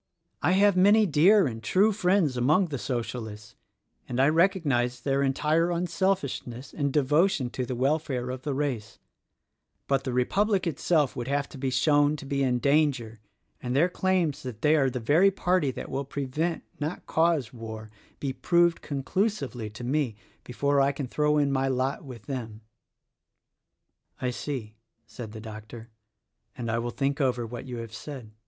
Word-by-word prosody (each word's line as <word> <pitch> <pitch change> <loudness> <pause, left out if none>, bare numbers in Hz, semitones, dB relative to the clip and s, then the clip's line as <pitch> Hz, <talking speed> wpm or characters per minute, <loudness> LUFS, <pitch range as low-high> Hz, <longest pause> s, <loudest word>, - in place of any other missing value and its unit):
I 180 - +3
have 200 0 +4
many 205 +4 +5
dear 185 +5 +5
and 115 -4 -4
true 195 - +3
friends 185 -7 +2
among 155 +9 +2
the 140 -3 -4
Socialists, 115 -4 -5 0.6
and 125 0 -2
I 135 +2 +5
recognize 155 -8 +2
their 135 +2 0
entire 155 +5 +2
unselfishness 170 -7 -2
and 140 -2 -1
devotion 150 0 +2
to 125 -2 -3
the 125 - -3
welfare 135 -1 0
of 130 0 -6
the 145 -1 -3
race; 130 -7 -3 0.9
but 135 -1 +1
the 130 - -3
Republic 195 - +1
itself 155 -2 +1
would 120 -1 -4
have 140 0 0
to - - -11
be 135 0 -1
shown 145 +3 +3
to 145 - -9
be 140 0 -1
in 125 -2 +2
danger 135 -5 +1 0.4
and 125 0 -3
their 165 +6 +4
claims 180 -5 0
that 125 -5 -8
they 150 +1 +5
are 135 -3 +3
the 125 0 -4
very 155 +12 +4
party 185 -5 +1
that 130 - -6
will 135 +1 -2
prevent, 145 +5 -2 0.2
not 150 +4 -4
cause, 160 -7 +1
war, 110 -2 -8 0.3
be 135 -2 -2
proved 170 +3 +2
conclusively 140 - -2
to 110 +3 -10
me, 130 -2 0 0.3
before 140 +3 +1
I 135 +1 +3
can 140 0 -4
throw 150 +4 +1
in 145 -1 +2
my 135 0 +1
lot 130 +1 -1
with 125 -6 -10
them." 115 -6 -6 1.6
"I 125 -1 -1
see," 120 -5 -5 0.3
said 115 -2 -9
the 110 - -8
doctor, 110 +1 -10 0.7
"and 115 -2 -3
I 115 - 0
will 120 +1 -2
think 140 +3 -1
over 125 -3 +1
what 120 +3 -7
you 125 -1 -5
have 115 -1 -7
said. 110 0 -8
140 Hz, 170 wpm, -27 LUFS, 125-160 Hz, 1.6 s, many